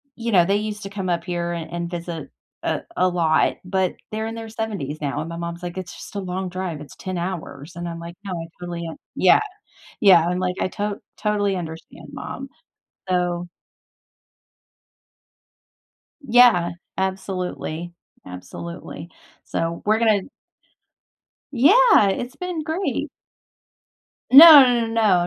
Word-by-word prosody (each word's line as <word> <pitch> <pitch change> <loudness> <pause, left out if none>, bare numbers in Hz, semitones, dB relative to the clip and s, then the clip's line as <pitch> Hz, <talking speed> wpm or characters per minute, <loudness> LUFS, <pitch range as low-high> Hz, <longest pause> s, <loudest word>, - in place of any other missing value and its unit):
you 235 0 -3
know, 175 -3 +5
they 200 +2 +2
used 210 0 -4
to 195 - -6
come 195 -2 -4
up 170 -1 0
here 175 -1 -3
an 165 -1 -5
and 170 0 -4
visit 170 -3 -6 0.3
a - - -1 0.2
a 185 - +3
lot, 165 -3 +2
but 185 0 0 0.2
they're 220 +1 -3
in 225 - -5
their 225 -1 -7
70s 205 -10 -4
now 140 0 -2
and 160 - -6
my 170 - -6
mom's 170 +1 -6
like, 175 +1 -6
"It's 185 -2 -6
just - - -11
a - - -1
long 185 0 -4
drive, 180 -4 -4
It's 150 - -12
10 185 -1 -5
hours." 170 -3 -6
And 175 0 -5
I'm 165 0 -6
like, 170 +1 -9
"No, 195 -2 -5
I 165 -1 -4
totally 175 -1 -5
un" 160 - -8 0.2
Yeah, 185 - +5 0.6
yeah, 175 -5 +6
I'm 180 +1 -1
like, 180 0 -1
"I - - 0
to 205 +1 -4 0.2
totally 205 -2 0
understand, 165 -2 -8
mom." - - -7 0.6
So 175 -1 -1 2.7
Yeah, 240 -9 +5 0.3
absolutely, 185 -3 -3 0.3
absolutely. 160 - -8 0.3
So, 165 0 -3
we're 215 +1 +3
gonna 215 -4 +3 1.3
Yeah, 315 - +6
it's 245 +7 -4
been 360 -3 -4
great! 325 +5 -2 1.2
No, 300 +1 +12
no, 240 -2 +2
no, 210 -6 +2
185 Hz, 145 wpm, -22 LUFS, 170-215 Hz, 2.7 s, No